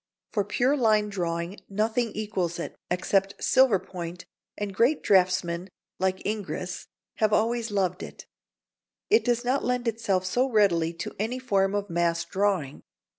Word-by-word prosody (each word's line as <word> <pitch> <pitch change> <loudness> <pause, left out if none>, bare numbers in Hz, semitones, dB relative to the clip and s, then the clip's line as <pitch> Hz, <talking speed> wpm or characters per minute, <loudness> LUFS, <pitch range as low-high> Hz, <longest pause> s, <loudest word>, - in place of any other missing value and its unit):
For 205 - +1
pure 245 +7 +1
line 215 -5 +3
drawing 170 -1 -3
nothing 220 +3 0
equals 190 -5 -2
it, 170 - -5
except 195 +2 +1
silver 260 -6 +5
point, 175 -1 -7 0.3
and 205 -1 -3
great 240 +9 +2
draughtsmen, 185 -2 +2 0.3
like 190 0 -1
Ingres, 195 -3 -4 0.3
have 215 -1 +2
always 230 +2 +1
loved 190 -2 0
it. - - -9 0.9
It 440 - +5
does 240 0 0
not 260 +3 +1
lend 250 0 -1
itself 205 -5 0
so 250 +8 +1
readily 185 -8 +3
to 170 - -6
any 225 +5 -1
form 200 -6 +1
of 205 0 -1
mass 170 -1 0
drawing. 185 -6 -1
200 Hz, 145 wpm, -27 LUFS, 180-225 Hz, 0.9 s, silver